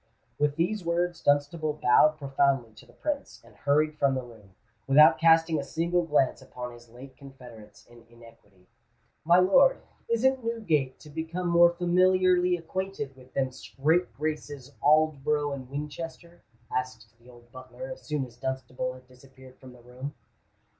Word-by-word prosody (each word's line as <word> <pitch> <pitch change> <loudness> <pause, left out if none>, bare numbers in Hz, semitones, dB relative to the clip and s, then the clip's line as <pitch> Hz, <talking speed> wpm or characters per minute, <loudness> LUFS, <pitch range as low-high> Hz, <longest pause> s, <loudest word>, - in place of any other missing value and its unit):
With 145 0 +1
these 180 +5 -1
words, 170 0 -1
Dunstable 145 +2 +1
bowed 150 +2 +4
profoundly 135 -4 0
to 110 - -17
the - - -20
Prince, 295 -2 -4
and - - -20
hurried 150 +1 0
from 135 -1 +2
the 130 - -3
room, 110 -6 -16 0.3
without 150 +3 +6
casting 165 -1 +4
a - - -3
single 170 +4 0
glance 145 -4 +1
upon 125 -1 -8
his 120 0 -16
late 130 +3 -13
confederates 120 -7 -14
in 120 -1 -19
iniquity. 115 -5 -19 0.6
"My 170 +2 +5
lord, 195 - +5 0.3
isn't 260 +2 +1
Newgate 170 - -1
to 150 - -13
become 165 +3 -4
more 170 0 +6
familiarly 180 +1 +2
acquainted 170 -4 -5
with 130 0 -18
them 130 -1 0
scrape 155 +7 -1
graces 145 -3 -5
Aldborough 150 -1 +2
and 130 -2 -8
Winchester?" 165 +4 -7 0.3
asked 125 -3 -4
the 120 +1 -19
old 120 -1 -18
butler, 130 - -9
as - - -9
soon 150 -3 -3
as 120 - -16
Dunstable 130 -1 -4
had 130 0 -16
disappeared 130 0 -18
from 130 -1 -13
the 125 - -17
room. 130 +4 -8
145 Hz, 155 wpm, -27 LUFS, 130-170 Hz, 0.6 s, without